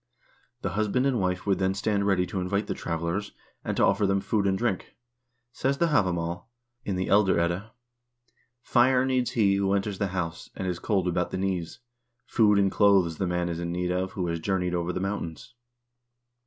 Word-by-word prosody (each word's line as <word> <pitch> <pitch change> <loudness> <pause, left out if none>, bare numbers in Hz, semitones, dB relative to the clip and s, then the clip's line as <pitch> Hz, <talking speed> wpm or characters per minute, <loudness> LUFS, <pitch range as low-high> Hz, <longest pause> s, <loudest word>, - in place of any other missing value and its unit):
The - - -1
husband 110 +5 0
and 130 -4 +1
wife 90 -1 -1
would 100 -2 +1
then 95 0 +1
stand 100 0 0
ready 95 -2 +2
to 90 +2 -4
invite 100 +3 -1
the - - -2
travelers, 85 +5 -3 0.3
and - - -3
to - - +5
offer 100 0 +2
them 95 0 +2
food 100 0 0
and 95 -1 +1
drink. 100 -4 -2 0.6
Says 135 +2 -1
the 170 +2 +2
"Havamal," 90 - 0 0.4
in 100 - -2
the 95 0 -1
"Elder 100 -3 +4
Edda": 85 +6 -1 0.9
"Fire 125 +1 +3
needs 130 -2 +1
he 100 -4 +3
who 100 0 +1
enters 100 -1 -2
the 100 - +1
house 90 -3 -4
and 95 - -4
is 90 -1 -2
cold 95 -4 0
about 90 0 0
the - - -4
knees; 95 +2 -3 0.4
food 105 -3 +3
and 100 -1 +3
clothes 95 -6 +3
the 95 - 0
man 90 0 -1
is 85 -1 -3
in 85 0 -3
need 90 0 -1
of 95 +1 -2
who 90 - -2
has 85 -1 -2
journeyed 90 0 -1
over 85 0 -1
the 90 - -3
mountains." 100 +4 -4
95 Hz, 195 wpm, -27 LUFS, 90-105 Hz, 0.9 s, to